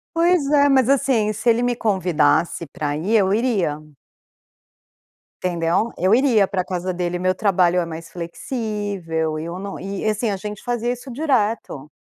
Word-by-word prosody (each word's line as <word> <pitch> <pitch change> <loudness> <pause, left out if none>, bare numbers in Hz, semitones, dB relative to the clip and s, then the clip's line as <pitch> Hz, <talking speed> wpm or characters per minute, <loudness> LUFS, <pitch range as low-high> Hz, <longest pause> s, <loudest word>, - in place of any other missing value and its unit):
Pois 340 -2 +3
é, 285 -1 +5
mas 265 -3 +3
assim, 250 -6 +2
se 215 +3 0
ele 235 +1 +3
me 245 0 +1
convidasse 170 -7 +1
para 145 +1 -3
ir, 195 +9 0
eu 195 -3 +3
iria. 205 - 0 1.6
Entendeu? 175 +5 0
Eu 185 +4 +2
iria 235 -5 +4
para 190 -1 -1
a - - -5
casa 185 0 -3
dele. 175 0 -2
Meu 185 +1 +1
trabalho 185 -3 +2
é 175 - 0
mais 165 0 -8
flexível 175 -4 -3
e 155 - -5
eu 170 +1 -5
não 195 +1 -6
e, 195 +2 -5
assim, 215 +1 0
a 200 - -1
gente 210 +1 -7
fazia 240 -1 -1
isso 250 +2 -10
direto. 225 - -1
200 Hz, 170 wpm, -21 LUFS, 175-235 Hz, 1.6 s, é